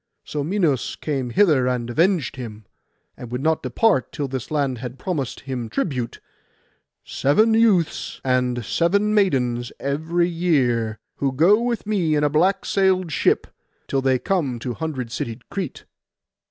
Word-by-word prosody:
So 145 Hz, -1 st, -3 dB
Minos 160 Hz, -, 0 dB
came 135 Hz, -5 st, -3 dB
hither 155 Hz, -6 st, +3 dB
and 125 Hz, -2 st, -1 dB
avenged 165 Hz, +3 st, +1 dB
him, 110 Hz, -4 st, -8 dB, 0.5 s
and 120 Hz, -, -9 dB
would 125 Hz, +2 st, -3 dB
not 160 Hz, 0 st, +2 dB
depart 135 Hz, -, +1 dB
till 145 Hz, -3 st, -3 dB
this 130 Hz, -2 st, -5 dB
land 140 Hz, -5 st, -1 dB
had 125 Hz, +1 st, -6 dB
promised 150 Hz, -8 st, -3 dB
him 125 Hz, -4 st, -5 dB
tribute—seven 140 Hz, -, -2 dB
youths 215 Hz, -8 st, +2 dB
and 125 Hz, -2 st, 0 dB
seven 200 Hz, -, +1 dB
maidens 125 Hz, -, +1 dB
every 160 Hz, +5 st, 0 dB
year, 130 Hz, -11 st, +1 dB, 0.2 s
who 135 Hz, -1 st, 0 dB
go 175 Hz, -, +4 dB
with 240 Hz, -2 st, -2 dB
me 185 Hz, -7 st, +1 dB
in 150 Hz, -, +1 dB
a 150 Hz, -, +3 dB
black 185 Hz, +6 st, +2 dB
sailed 185 Hz, -3 st, +2 dB
ship, -, -, +2 dB, 0.4 s
till 135 Hz, -, 0 dB
they 130 Hz, -1 st, +2 dB
come 150 Hz, -, -1 dB
to 120 Hz, +1 st, -4 dB
hundred 130 Hz, -4 st, -4 dB
citied 115 Hz, +1 st, -5 dB
Crete. 190 Hz, -8 st, -5 dB
145 Hz, 145 wpm, -22 LUFS, 125-180 Hz, 0.5 s, go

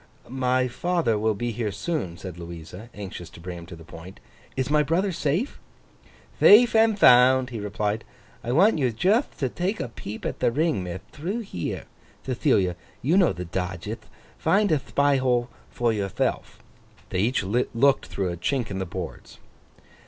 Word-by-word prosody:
'My 130 Hz, 0 st, +1 dB
father 130 Hz, -4 st, 0 dB
will 110 Hz, 0 st, +1 dB
be 120 Hz, +4 st, -2 dB
here 110 Hz, -1 st, -2 dB
soon,' 100 Hz, -, -3 dB
said 90 Hz, -2 st, -8 dB
Louisa, 85 Hz, +5 st, -9 dB
anxious 95 Hz, -5 st, -8 dB
to 85 Hz, -, -14 dB
bring 90 Hz, 0 st, -7 dB
him 85 Hz, -, -10 dB
to 85 Hz, -, -9 dB
the 80 Hz, -, -13 dB
point. 85 Hz, +4 st, -12 dB, 0.4 s
'Is 130 Hz, +1 st, -1 dB
my 150 Hz, 0 st, +4 dB
brother 170 Hz, +6 st, +1 dB
safe?' 170 Hz, -, -1 dB, 0.8 s
'Thafe 230 Hz, +3 st, +7 dB
and 220 Hz, -1 st, +4 dB
thound!' 125 Hz, -4 st, +6 dB
he 115 Hz, -, -4 dB
replied. 105 Hz, +1 st, -2 dB, 0.4 s
'I 120 Hz, +1 st, -2 dB
want 185 Hz, +4 st, +4 dB
you 130 Hz, -3 st, +2 dB
jutht 195 Hz, -, +1 dB
to 135 Hz, -, 0 dB
take 185 Hz, -, -2 dB
a -, -, -3 dB
peep 110 Hz, -2 st, -8 dB
at -, -, -3 dB
the -, -, +2 dB
Ring, 150 Hz, -, 0 dB
mith, 90 Hz, +1 st, -6 dB
through 185 Hz, +10 st, -4 dB
here. 90 Hz, -, -5 dB, 0.4 s
Thethilia, 120 Hz, -, +1 dB, 0.3 s
you 155 Hz, +8 st, +2 dB
know 190 Hz, -3 st, +5 dB
the 90 Hz, -, -5 dB
dodgeth; 90 Hz, 0 st, -5 dB, 0.3 s
find 205 Hz, 0 st, +2 dB
a 155 Hz, -, +3 dB
thpy 140 Hz, 0 st, +1 dB
hole 125 Hz, -1 st, +1 dB, 0.2 s
for 120 Hz, -2 st, 0 dB
yourthelf.' 100 Hz, -3 st, -2 dB, 0.5 s
They 90 Hz, -, -2 dB
each 115 Hz, +3 st, +1 dB
looked 125 Hz, +6 st, +2 dB
through 95 Hz, -2 st, -2 dB
a 85 Hz, -, -5 dB
chink 120 Hz, -, -1 dB
in 95 Hz, -, -3 dB
the 95 Hz, -, -3 dB
boards. 90 Hz, -1 st, -7 dB
120 Hz, 175 wpm, -25 LUFS, 95-150 Hz, 0.8 s, Thafe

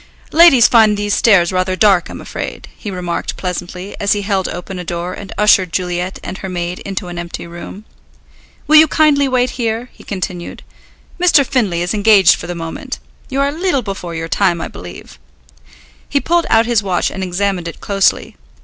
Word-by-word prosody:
"Ladies 310 Hz, -7 st, +7 dB
find 220 Hz, -3 st, +4 dB
these 205 Hz, 0 st, -1 dB
stairs 195 Hz, -6 st, +4 dB
rather 185 Hz, 0 st, 0 dB
dark, 190 Hz, -3 st, +3 dB
I'm -, -, -8 dB
afraid," -, -, -6 dB
he 210 Hz, -, -7 dB
remarked 180 Hz, -3 st, -4 dB
pleasantly, 180 Hz, +1 st, -5 dB
as 200 Hz, 0 st, +2 dB
he 205 Hz, -1 st, -2 dB
held 195 Hz, -2 st, 0 dB
open 180 Hz, +2 st, -6 dB
a -, -, -5 dB
door 175 Hz, +1 st, -4 dB
and 200 Hz, 0 st, -9 dB
ushered 195 Hz, -4 st, +4 dB
Juliet 180 Hz, +1 st, -2 dB
and 190 Hz, -, -6 dB
her 190 Hz, -, -6 dB
maid 175 Hz, 0 st, -4 dB
into 195 Hz, -1 st, -5 dB
an 175 Hz, 0 st, -6 dB
empty 170 Hz, 0 st, -6 dB
room. 175 Hz, +5 st, -10 dB, 0.8 s
"Will 310 Hz, -, +6 dB
you 315 Hz, +1 st, +8 dB
kindly 290 Hz, -2 st, +3 dB
wait 255 Hz, -1 st, +1 dB
here," 230 Hz, +2 st, -2 dB
he -, -, -16 dB
continued. 185 Hz, -3 st, -5 dB, 0.6 s
"Mr. 330 Hz, -6 st, +5 dB
Findlay 210 Hz, -11 st, 0 dB
is 175 Hz, -, -2 dB
engaged 205 Hz, -3 st, +5 dB
for -, -, -6 dB
the 175 Hz, -, -4 dB
moment. 165 Hz, -1 st, -6 dB, 0.3 s
You 270 Hz, +1 st, -1 dB
are 280 Hz, -, +2 dB
a -, -, -3 dB
leetle 320 Hz, -4 st, -1 dB
before 195 Hz, -4 st, -6 dB
your 165 Hz, 0 st, -4 dB
time, 170 Hz, +1 st, +1 dB
I -, -, -4 dB
believe." 90 Hz, -7 st, -11 dB, 0.9 s
He 280 Hz, -, +1 dB
pulled 340 Hz, +3 st, +1 dB
out 225 Hz, 0 st, +4 dB
his 235 Hz, -2 st, +2 dB
watch 185 Hz, -3 st, -1 dB
and 190 Hz, -, -6 dB
examined 185 Hz, -1 st, -1 dB
it 170 Hz, -, -8 dB
closely. 195 Hz, -1 st, 0 dB
195 Hz, 190 wpm, -16 LUFS, 175-230 Hz, 0.9 s, you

